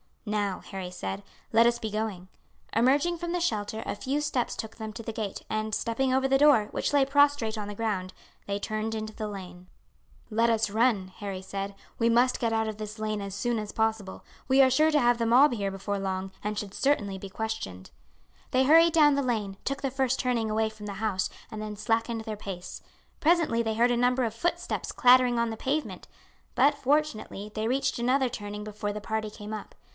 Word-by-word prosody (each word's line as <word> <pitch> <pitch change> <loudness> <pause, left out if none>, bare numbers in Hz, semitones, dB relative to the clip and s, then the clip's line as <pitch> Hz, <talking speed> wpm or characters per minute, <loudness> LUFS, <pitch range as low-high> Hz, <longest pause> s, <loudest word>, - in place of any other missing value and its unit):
"Now," 205 -3 -1
Harry 190 -2 -6
said, 190 +2 -5 0.3
"let 230 +1 +6
us 235 0 +3
be 220 -2 -5
going." 210 -4 -3 0.5
Emerging 280 +9 +3
from 345 +1 -4
the 355 - 0
shelter, 220 -8 -1
a - - -3
few 275 +7 -2
steps 280 -5 -1
took 220 0 -7
them 220 -1 -6
to 230 +1 -7
the 225 - -4
gate, 215 -3 -5
and 215 0 -1
stepping 255 +3 0
over 265 +1 +2
the 270 0 +4
door, 275 -7 +5
which - - -1
lay 280 -2 +5
prostrate 280 -5 +3
on 210 -1 -4
the 205 - -6
ground, 195 -4 -2 0.3
they 200 0 -1
turned 215 +2 -3
into 215 0 -5
the 215 -1 -4
lane. 185 -3 -9 0.6
"Let 230 +1 +2
us 220 -2 +2
run," 215 -3 +2
Harry 195 -3 -5
said; 195 +1 -5 0.2
"we 230 0 +3
must 245 +2 +3
get 230 -2 0
out 220 0 +1
of 215 -1 -4
this 215 0 -6
lane 215 -1 -2
as 200 -1 -5
soon 235 +2 0
as 210 -1 -5
possible. 220 -3 -1 0.2
We 270 +1 +5
are 260 - +6
sure 305 +5 +4
to 305 -1 +3
have 240 -2 +3
the 230 - 0
mob 250 +5 +6
here 200 -4 -1
before 195 +1 -3
long, 190 0 -3
and 210 0 -2
should 200 -2 -4
certainly 205 -9 +1
be 195 +1 -8
questioned." 205 - -5 0.6
They 255 +1 +4
hurried 325 +4 +6
down 295 -3 +6
the 280 - +1
lane, 210 -6 -2
took 275 0 -2
the 270 -2 -1
first 265 -1 0
turning 240 -4 0
away 220 +1 +1
from 215 -1 -11
the 205 - -4
house, 195 -2 -1 0.2
and 215 - -6
then 215 0 -5
slackened 225 +2 0
their 220 -1 -5
pace. 190 -3 -7 0.4
Presently 315 -8 +3
they 220 -1 -1
heard 240 +2 +3
a 240 - +2
number 250 +1 +2
of 225 -2 -1
footsteps 285 +10 -2
clattering 250 -1 +5
on 235 0 +1
the 225 - -5
pavement; 290 +6 -2 0.5
but 285 +1 +4
fortunately 275 -7 -1
they 215 0 -2
reached 265 +1 0
another 255 +2 +2
turning 210 -3 -6
before 210 -1 -4
the 210 - -5
party 220 0 -2
came 210 0 -8
up. 215 - -7
220 Hz, 210 wpm, -28 LUFS, 210-255 Hz, 0.6 s, let